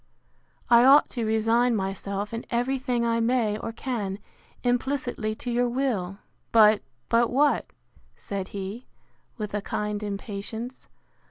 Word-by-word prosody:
I 235 -1 +7
ought 275 +3 +6
to 235 -3 -2
resign 225 +2 +2
myself, 200 +1 -3
in 230 - -3
every 250 +3 0
thing 250 -3 0
I 230 0 +1
may 230 -3 +1
or 225 - -4
can, 220 -6 -3 0.5
implicitly 245 -3 -1
to 245 +2 -5
your 245 +1 +2
will. 230 -8 -1 0.3
But—But 215 - +3
what? 285 +3 +2 0.5
said 195 -2 -5
he, 200 +5 -6 0.5
with 210 -3 -5
a 205 - -1
kind 210 +1 -3
impatience. 210 +4 -5
230 Hz, 125 wpm, -26 LUFS, 205-245 Hz, 0.5 s, I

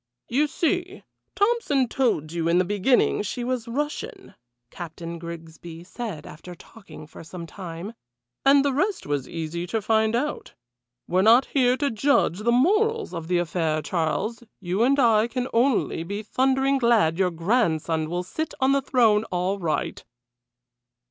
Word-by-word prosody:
"You 285 +5 +2
see, 350 +4 -2 0.3
Tompson 405 - +2
told 225 - 0
you 165 -1 -2
in 170 +1 +3
the 180 - +3
beginning 205 +6 +2
she 210 +4 -4
was 245 -2 -2
Russian," 295 - -4 0.4
Captain 170 0 -7
Grigsby 165 0 -9
said 185 -5 -7
after 175 +3 -10
talking 195 -4 -13
for 150 - -12
some 170 +1 -8
time, 175 +3 -8 0.5
"and 275 +1 +5
the 280 - +1
rest 375 +8 -1
was 145 -3 -2
easy 170 +1 -4
to 225 +5 -1
find 220 +1 +1
out. 295 +5 -3 0.5
We're 185 +2 +2
not 230 +6 +6
here 255 -2 +3
to 285 0 0
judge 225 - +2
the 230 +3 +1
morals 425 - +2
of 165 -2 -5
the 180 0 +1
affair, 160 -2 -1
Charles; 165 - -2 0.2
you 185 +2 -2
and 270 +4 +4
I 225 -3 +4
can 250 +1 -3
only 235 -7 +1
be 200 +5 -5
thundering 265 +4 +1
glad 220 -9 +3
your 185 -1 +3
grandson 165 -4 0
will 175 +1 -2
sit 315 - -5
on 265 0 +3
that 275 0 0
throne 225 -5 +4
all 185 +1 -2
right." 165 -4 -2
215 Hz, 155 wpm, -24 LUFS, 170-265 Hz, 0.5 s, not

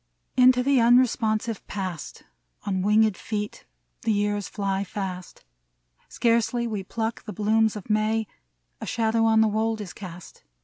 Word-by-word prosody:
Into 250 0 +5
the 275 0 +3
unresponsive 230 -2 +2
past 185 -6 -5 0.4
On 190 -2 -1
winged 210 +1 +3
feet 210 +2 -5 0.3
the 225 - 0
years 205 -1 0
fly 195 -1 -2
fast: 185 -2 -6 0.6
Scarcely 235 +1 +1
we 215 -4 -3
pluck 225 +3 -3
the 210 - -6
blooms 220 +2 +2
of 205 - -8
May, 215 +1 +1 0.6
A - - -5
shadow 225 0 +1
on 220 0 +4
the 220 - +4
wold 220 +1 0
is 200 -4 -7
cast. 180 -3 -10
215 Hz, 140 wpm, -25 LUFS, 200-225 Hz, 0.6 s, Into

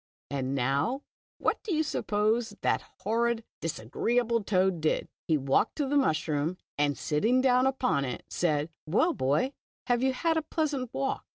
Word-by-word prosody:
And 135 -1 -1
now, 140 - 0 0.3
what - - 0
do 385 -7 -2
you 315 - +2
sup 305 - -3
pose 220 +3 +1
that - - +2 0.2
horrid, 235 0 +1 0.2
disagreeable 230 - 0
toad 185 -4 +2
did? 155 - +1 0.2
He 160 - +3
walked 135 -1 +1
to 295 - 0
the 280 +2 -1
mushroom, 160 - +1 0.2
and 145 -2 +1
sitting 215 - +2
down 255 0 +4
upon 250 - +1
it, 125 -2 -4
said, 155 -2 0 0.2
"Well, 310 - +3
Boy, 150 - +1 0.3
have 245 -1 +2
you 265 0 +2
had 325 +4 +1
a - - +2
pleasant 290 -6 -2
walk?" 270 0 -2
220 Hz, 165 wpm, -29 LUFS, -, 0.3 s, down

